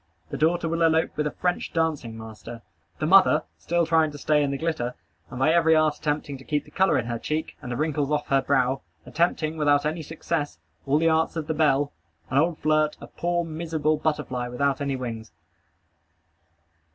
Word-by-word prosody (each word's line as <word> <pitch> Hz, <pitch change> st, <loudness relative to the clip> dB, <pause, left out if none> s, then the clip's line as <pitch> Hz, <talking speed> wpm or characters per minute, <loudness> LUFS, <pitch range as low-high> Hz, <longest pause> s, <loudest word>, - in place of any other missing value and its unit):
The -, -, -3 dB
daughter 165 Hz, +2 st, +2 dB
will 165 Hz, +1 st, -1 dB
elope 160 Hz, 0 st, +2 dB
with 150 Hz, 0 st, 0 dB
a -, -, -3 dB
French 180 Hz, -1 st, -2 dB
dancing 155 Hz, -9 st, -1 dB
master. 110 Hz, +1 st, -9 dB, 0.3 s
The 155 Hz, -, -2 dB
mother, 180 Hz, -3 st, +6 dB, 0.2 s
still 170 Hz, 0 st, +1 dB
trying 160 Hz, -1 st, +3 dB
to 145 Hz, -, -9 dB
stay 150 Hz, +1 st, +2 dB
in 145 Hz, -, +1 dB
the 140 Hz, -, -2 dB
glitter, 145 Hz, -6 st, -2 dB, 0.3 s
and 125 Hz, -, -8 dB
by 155 Hz, +5 st, +3 dB
every 165 Hz, -1 st, +4 dB
art 155 Hz, -1 st, +2 dB
attempting 145 Hz, -2 st, -3 dB
to -, -, -12 dB
keep 150 Hz, +1 st, -1 dB
the -, -, -17 dB
color 190 Hz, 0 st, +3 dB
in -, -, -1 dB
her 120 Hz, -1 st, -3 dB
cheek, 155 Hz, +5 st, -3 dB
and 125 Hz, -, -6 dB
the 120 Hz, -, -2 dB
wrinkles 150 Hz, -1 st, 0 dB
off 150 Hz, -1 st, 0 dB
her 135 Hz, 0 st, +3 dB
brow, 135 Hz, -1 st, +1 dB, 0.2 s
attempting, 160 Hz, -1 st, 0 dB
without 145 Hz, -1 st, +3 dB
any 160 Hz, +2 st, -1 dB
success, 155 Hz, -, -3 dB, 0.3 s
all 140 Hz, -, +3 dB
the 165 Hz, +1 st, +2 dB
arts 160 Hz, +1 st, +2 dB
of 160 Hz, -2 st, -3 dB
the 160 Hz, -, -1 dB
belle, 145 Hz, -2 st, +2 dB, 0.4 s
an 135 Hz, -, +3 dB
old 165 Hz, +1 st, +1 dB
flirt, 155 Hz, 0 st, +1 dB
a -, -, -9 dB
poor, 175 Hz, 0 st, -2 dB
miserable 160 Hz, -1 st, -1 dB
butterfly 150 Hz, -5 st, -2 dB
without 135 Hz, +3 st, 0 dB
any 140 Hz, -1 st, -1 dB
wings. 115 Hz, -4 st, -6 dB
150 Hz, 200 wpm, -25 LUFS, 135-160 Hz, 0.4 s, mother